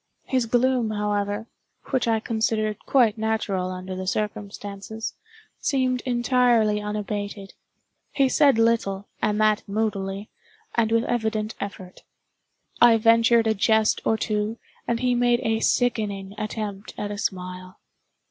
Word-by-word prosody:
His 255 -3 0
gloom, 245 0 +2
however 205 0 -1 0.5
(which 260 -3 +1
I 225 -1 +2
considered 220 -1 -1
quite 230 -5 +3
natural 215 -4 -1
under 185 0 -6
the 185 0 -5
circumstances), 205 +1 -4 0.5
seemed 255 -2 0
entirely 240 -4 +3
unabated. 205 -1 -4 0.6
He 275 -1 +3
said 275 -2 +4
little, 225 -4 +1
and 210 -1 +1
that 215 0 +3
moodily, 200 -1 -2 0.4
and 225 -2 +1
with 230 0 +3
evident 220 -3 -1
effort. 185 -2 -7 0.8
I 235 -1 +7
ventured 230 +1 +4
a 220 - +3
jest 220 +1 +2
or 220 - +2
two, 215 +1 -1 0.3
and 235 0 0
he 250 -1 +2
made 245 0 +2
a 225 0 +1
sickening 205 -6 0
attempt 215 -1 -5
at 205 - -3
a 205 - -5
smile. 185 -2 -5
215 Hz, 130 wpm, -24 LUFS, 205-230 Hz, 0.8 s, I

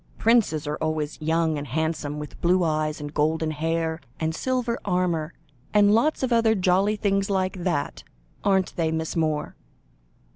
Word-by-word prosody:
Princes 220 -10 +2
are 150 +1 -2
always 155 -1 -2
young 160 -1 +1
and 145 - -6
handsome, 155 +1 -2
with 150 0 -8
blue 180 +1 +3
eyes 155 -1 0
and 145 0 -7
golden 155 +1 +1
hair, 160 +1 -1 0.2
and 160 0 -1
silver 250 +3 -1
armour, 180 -4 0 0.4
and 205 0 +6
lots 265 +6 +2
of 255 -2 +1
other 225 -1 +4
jolly 190 +2 +2
things 195 -1 0
like 190 -1 -1
that, 170 -6 -2 0.4
aren't 190 -2 +1
they, 165 -2 +1
Miss 160 0 -2
Moore?" 155 -2 -1
165 Hz, 155 wpm, -25 LUFS, 155-195 Hz, 0.4 s, and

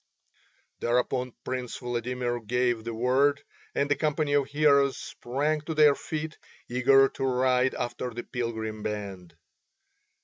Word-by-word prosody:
Thereupon 125 +1 0
Prince 125 -2 -3
Vladimir 120 0 -2
gave 120 0 0
the 115 - -4
word, 135 +4 +2 0.3
and 140 +1 0
a - - +5
company 150 -1 0
of 145 -2 +3
heroes 140 -2 +3
sprang 145 +5 -2
to 160 +1 -5
their 150 -2 +7
feet, 155 +2 -5 0.3
eager 135 +2 +5
to 135 - -6
ride 130 0 +2
after 120 +1 -3
the 120 0 -6
pilgrim 110 -3 -4
band. 100 -5 -5
125 Hz, 130 wpm, -27 LUFS, 120-140 Hz, 0.3 s, their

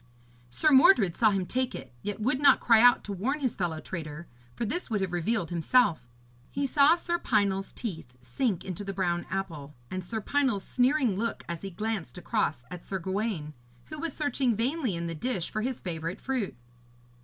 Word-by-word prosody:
Sir 305 - +2
Mordred 250 - +6
saw 220 - +4
him 195 -3 0
take 255 +5 -1
it, - - -9
yet 205 0 -4
would 255 +4 +1
not 290 - +6
cry 225 -2 +5
out 245 0 +6
to 205 - -5
warn 255 +11 -1
his 255 -5 -1
fellow 170 -4 -2
traitor, 160 -1 -6 0.3
for 235 - -2
this 335 - -3
would 215 -3 0
have 190 -2 -2
revealed 175 +1 -1
himself. 170 - +2 0.4
He 280 +1 -2
saw 285 +3 +5
Sir 345 0 -2
Pinel's 200 - +1
teeth 160 - -6
sink 170 - -2
into 185 +1 -5
the 195 0 -4
brown 175 -2 -1
apple, 160 -7 -4 0.2
and 185 0 -3
Sir 220 +5 -4
Pinel's 250 -3 0
sneering 255 -4 +2
look 230 +4 -2
as 170 -1 -5
he 195 - -5
glanced 210 -1 -4
across 155 -6 -1
at 180 -1 -7
Sir 195 - -3
Gawaine, 190 -4 -3 0.4
who 310 - -6
was 330 -2 -3
searching 275 -5 0
vainly 250 - -1
in 170 0 -3
the 165 - -3
dish 190 0 -3
for 215 - -2
his 255 +2 -2
favourite 165 -1 -4
fruit. 255 - -3
205 Hz, 190 wpm, -28 LUFS, 175-255 Hz, 0.4 s, Mordred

